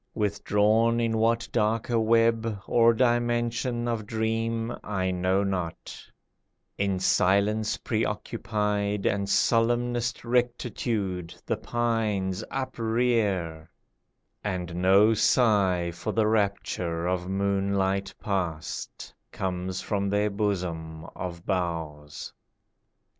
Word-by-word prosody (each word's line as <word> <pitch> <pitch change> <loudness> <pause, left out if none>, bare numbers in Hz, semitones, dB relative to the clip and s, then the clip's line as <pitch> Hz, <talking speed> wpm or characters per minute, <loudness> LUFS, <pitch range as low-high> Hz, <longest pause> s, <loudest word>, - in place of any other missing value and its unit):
Withdrawn 105 +2 +2
in 115 -1 0
what 115 +1 +2
darker 115 +1 +1
web 115 -1 +2
Or 115 0 +5
dimension 120 0 +1
of 115 -3 -2
dream 115 +1 -1
I 95 -3 -1
know 95 +2 +1
not, 90 -4 -3 0.8
In 100 -1 0
silence 100 +4 +2
pre 110 0 -1
occupied 105 -1 -2
And 100 0 0
solemnest 120 +2 +1
rectitude 115 -7 -1
The - - -1
pines 110 -5 -1
uprear, 110 -10 -1 0.7
and 90 -4 -3
no 100 +4 +5
sigh 100 -7 +3
For 85 - -4
the 110 -1 +2
rapture 100 -5 0
of 90 0 -1
moonlight 100 0 0
past, 90 -6 -4 0.2
Comes 95 0 -3
from 100 -1 -1
their 105 +1 +1
bosom 85 -6 -3
of 85 -2 -6
boughs. 80 -6 -3
105 Hz, 95 wpm, -27 LUFS, 95-115 Hz, 0.8 s, Or